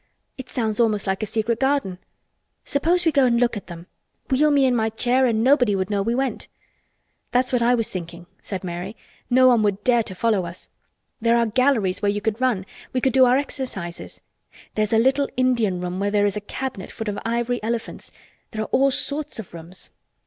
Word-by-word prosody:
"It 260 Hz, -1 st, -9 dB
sounds 220 Hz, -3 st, -2 dB
almost 215 Hz, -3 st, +2 dB
like 190 Hz, +1 st, -1 dB
a 215 Hz, -, -2 dB
secret 220 Hz, +2 st, -1 dB
garden. 265 Hz, -10 st, 0 dB, 0.7 s
Suppose 340 Hz, +5 st, +1 dB
we 325 Hz, -, +4 dB
go 275 Hz, -3 st, +4 dB
and 235 Hz, -1 st, +2 dB
look 240 Hz, -1 st, +2 dB
at 205 Hz, -, -7 dB
them. 170 Hz, -1 st, -9 dB, 0.5 s
Wheel 295 Hz, +4 st, +4 dB
me 285 Hz, -2 st, +4 dB
in 255 Hz, -1 st, +2 dB
my 220 Hz, -1 st, +1 dB
chair 245 Hz, +4 st, +2 dB
and 225 Hz, -2 st, +1 dB
nobody 250 Hz, -5 st, +4 dB
would 190 Hz, +1 st, -2 dB
know 200 Hz, -1 st, +1 dB
we 230 Hz, +4 st, 0 dB
went." 265 Hz, 0 st, -2 dB, 0.8 s
"That's 250 Hz, +1 st, +1 dB
what 245 Hz, -, +2 dB
I 240 Hz, +1 st, +4 dB
was 230 Hz, -2 st, -2 dB
thinking," 170 Hz, -1 st, -7 dB, 0.2 s
said 190 Hz, -2 st, -6 dB
Mary. 180 Hz, +3 st, -5 dB, 0.3 s
"No 255 Hz, +1 st, +5 dB
one 240 Hz, -3 st, +5 dB
would 205 Hz, -1 st, 0 dB
dare 240 Hz, 0 st, +3 dB
to 195 Hz, -4 st, -6 dB
follow 215 Hz, -1 st, +1 dB
us. 170 Hz, +2 st, -10 dB, 0.5 s
There 230 Hz, +1 st, +3 dB
are 235 Hz, -, +3 dB
galleries 225 Hz, -5 st, +1 dB
where 205 Hz, -, +2 dB
you 205 Hz, -, -2 dB
could 220 Hz, +3 st, -2 dB
run. 235 Hz, -8 st, +1 dB, 0.3 s
We 255 Hz, -, +1 dB
could 260 Hz, -1 st, +1 dB
do 260 Hz, -1 st, +6 dB
our 250 Hz, +1 st, +4 dB
exercises. 250 Hz, -11 st, -5 dB, 0.5 s
There 215 Hz, -, -1 dB
is 215 Hz, -, 0 dB
a -, -, +5 dB
little 265 Hz, +4 st, +2 dB
Indian 235 Hz, -8 st, +1 dB
room 180 Hz, +1 st, -4 dB
where 200 Hz, +1 st, 0 dB
there 205 Hz, 0 st, +2 dB
is 200 Hz, -, 0 dB
a 210 Hz, -, -3 dB
cabinet 225 Hz, -2 st, -5 dB
full 220 Hz, -, -7 dB
of 205 Hz, -1 st, -3 dB
ivory 235 Hz, +1 st, -1 dB
elephants. 230 Hz, +1 st, -4 dB, 0.4 s
There 215 Hz, 0 st, -3 dB
are -, -, -8 dB
all 270 Hz, +2 st, +4 dB
sorts 290 Hz, +2 st, -1 dB
of 220 Hz, -6 st, -9 dB
rooms." 170 Hz, +2 st, -9 dB
230 Hz, 215 wpm, -22 LUFS, 200-255 Hz, 0.8 s, do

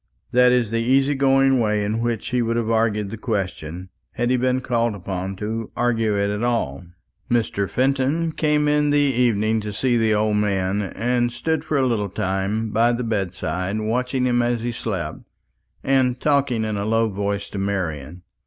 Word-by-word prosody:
That 125 Hz, 0 st, +5 dB
is 120 Hz, -4 st, +1 dB
the 115 Hz, -, 0 dB
easy 135 Hz, +4 st, +3 dB
going 135 Hz, -1 st, +3 dB
way 105 Hz, -2 st, +1 dB
in 105 Hz, +2 st, -1 dB
which 115 Hz, -2 st, -2 dB
he 125 Hz, -1 st, +1 dB
would 115 Hz, 0 st, 0 dB
have 115 Hz, -1 st, -1 dB
argued 110 Hz, -3 st, +1 dB
the 115 Hz, -, -7 dB
question, 95 Hz, -5 st, -4 dB, 0.2 s
had 120 Hz, +1 st, 0 dB
he -, -, +4 dB
been 130 Hz, +1 st, +1 dB
called 120 Hz, -3 st, 0 dB
upon 95 Hz, 0 st, -4 dB
to 110 Hz, +3 st, -4 dB
argue 115 Hz, -3 st, +1 dB
it 100 Hz, 0 st, +1 dB
at 105 Hz, +3 st, -3 dB
all. 90 Hz, -, -1 dB, 0.4 s
Mr. 110 Hz, -5 st, 0 dB
Fenton 135 Hz, -, +1 dB
came 150 Hz, -1 st, +1 dB
in 150 Hz, 0 st, +2 dB
the 145 Hz, -, +3 dB
evening 115 Hz, -6 st, +2 dB
to 105 Hz, 0 st, -5 dB
see 120 Hz, +4 st, +1 dB
the 110 Hz, -1 st, +2 dB
old 105 Hz, 0 st, +1 dB
man, 100 Hz, -1 st, 0 dB
and 120 Hz, +5 st, -1 dB
stood 160 Hz, +6 st, -2 dB
for 150 Hz, -, -1 dB
a 135 Hz, -, +2 dB
little 110 Hz, -5 st, 0 dB
time 100 Hz, +3 st, -2 dB
by 115 Hz, +3 st, +3 dB
the 120 Hz, +1 st, -2 dB
bedside 95 Hz, -2 st, -2 dB
watching 125 Hz, +4 st, -1 dB
him 120 Hz, -1 st, +2 dB
as 120 Hz, -1 st, 0 dB
he 120 Hz, +1 st, -2 dB
slept, 95 Hz, -9 st, -4 dB, 0.6 s
and 130 Hz, -2 st, +2 dB
talking 140 Hz, -6 st, +1 dB
in 110 Hz, -1 st, -2 dB
a 100 Hz, -, -2 dB
low 115 Hz, +1 st, +2 dB
voice 100 Hz, 0 st, -2 dB
to 100 Hz, -, -5 dB
Marian. 90 Hz, -5 st, -3 dB
115 Hz, 185 wpm, -22 LUFS, 100-125 Hz, 0.6 s, That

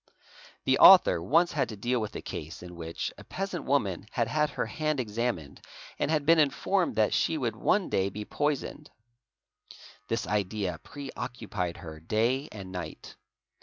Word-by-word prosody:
The -, -, +3 dB
author 85 Hz, -, +8 dB
once 165 Hz, -, +3 dB
had 135 Hz, -6 st, 0 dB
to 110 Hz, -, -6 dB
deal 120 Hz, +4 st, -1 dB
with 105 Hz, -, -5 dB
a -, -, -5 dB
case 80 Hz, +4 st, -7 dB
in 90 Hz, -1 st, -9 dB
which 85 Hz, -1 st, -4 dB
a -, -, -10 dB
peasant 195 Hz, -2 st, -4 dB
woman 100 Hz, -9 st, 0 dB
had 115 Hz, -3 st, 0 dB
had 150 Hz, +4 st, +1 dB
her 125 Hz, -3 st, -2 dB
hand 155 Hz, +4 st, -2 dB
examined 105 Hz, -, -3 dB, 0.4 s
and -, -, 0 dB
had 155 Hz, -2 st, +1 dB
been 165 Hz, +1 st, +6 dB
informed 170 Hz, +5 st, +1 dB
that 110 Hz, -1 st, +2 dB
she 160 Hz, -, +1 dB
would 120 Hz, -6 st, -2 dB
one 190 Hz, -, +1 dB
day 95 Hz, 0 st, +1 dB
_ -, -, -16 dB
be 105 Hz, +2 st, -6 dB
poisoned. 150 Hz, +2 st, -2 dB, 1.2 s
This 115 Hz, +2 st, -1 dB
idea 100 Hz, -4 st, -1 dB
preoccupied 120 Hz, -9 st, -5 dB
her 80 Hz, -2 st, -9 dB
day 115 Hz, -, 0 dB
and 95 Hz, -3 st, -8 dB
night. 90 Hz, -4 st, -7 dB
115 Hz, 165 wpm, -28 LUFS, 95-145 Hz, 1.2 s, author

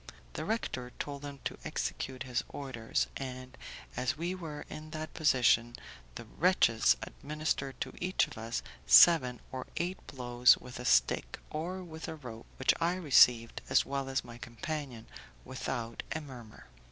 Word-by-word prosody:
The -, -, -4 dB
rector 130 Hz, -, -2 dB
told 140 Hz, -1 st, -5 dB
them 140 Hz, -2 st, -8 dB
to -, -, -4 dB
execute 130 Hz, -1 st, -3 dB
his 125 Hz, -2 st, -1 dB
orders, 130 Hz, -6 st, -2 dB
and, 130 Hz, -1 st, -7 dB, 0.4 s
as 125 Hz, +1 st, -1 dB
we 170 Hz, +3 st, -2 dB
were 160 Hz, -5 st, -7 dB
in 155 Hz, 0 st, -8 dB
that 155 Hz, 0 st, -6 dB
position, 120 Hz, -6 st, +3 dB, 0.4 s
the -, -, -7 dB
wretches 115 Hz, -5 st, +3 dB
administered 145 Hz, -3 st, -3 dB
to -, -, -3 dB
each 185 Hz, +1 st, +2 dB
of -, -, -11 dB
us 115 Hz, +1 st, -4 dB, 0.2 s
seven 130 Hz, -8 st, +7 dB
or 130 Hz, -1 st, -5 dB
eight 175 Hz, +3 st, -2 dB
blows 125 Hz, -1 st, +4 dB
with 125 Hz, -1 st, -10 dB
a 125 Hz, -, -6 dB
stick, -, -, +2 dB
or 180 Hz, +5 st, -4 dB
with 160 Hz, -2 st, -8 dB
a 160 Hz, -, -5 dB
rope, 120 Hz, -7 st, -10 dB
which 130 Hz, 0 st, +4 dB
I 170 Hz, +2 st, +2 dB
received, 125 Hz, -9 st, +5 dB
as -, -, +4 dB
well 135 Hz, -1 st, -3 dB
as 135 Hz, -1 st, -1 dB
my 120 Hz, 0 st, -10 dB
companion, 120 Hz, +1 st, -5 dB, 0.4 s
without 120 Hz, -3 st, -4 dB
a 155 Hz, -, -2 dB
murmur. 125 Hz, -7 st, -11 dB
130 Hz, 155 wpm, -32 LUFS, 120-155 Hz, 0.4 s, seven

